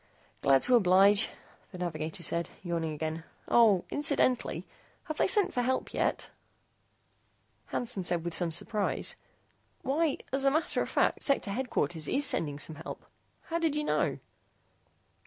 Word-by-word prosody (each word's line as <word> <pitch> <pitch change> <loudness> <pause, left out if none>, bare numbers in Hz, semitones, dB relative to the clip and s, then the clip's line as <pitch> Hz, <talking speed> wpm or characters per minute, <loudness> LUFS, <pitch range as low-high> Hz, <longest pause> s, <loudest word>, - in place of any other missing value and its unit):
"Glad 135 -1 +4
to 255 - +2
oblige," 200 -1 +5 0.4
the 185 - -9
navigator 165 -1 -4
said, 170 +1 -1
yawning 170 -3 -2
again. 160 +1 -4 0.2
"Oh, 215 -6 +4
incidentally, 285 -4 +1 0.4
have 310 -4 -6
they - - +2
sent 395 -1 +3
for 250 - 0
help 260 +1 -1
yet?" - - -1 1.4
Hansen 225 -5 -2
said 175 -1 +1
with 170 - -3
some 175 0 0
surprise, 205 +5 0 0.7
"Why, 295 +2 0 0.2
as 270 0 +2
a 275 - +5
matter 315 +4 0
of - - -3
fact, - - +1
Sector 275 -7 +1
Headquarters 175 - -2
is 285 +2 +2
sending 145 - +1
some 155 +1 -4
help. 160 - -8 0.4
How 335 0 -3
did 325 -3 0
you 300 - 0
know?" - - 0
200 Hz, 145 wpm, -30 LUFS, 165-270 Hz, 1.4 s, oblige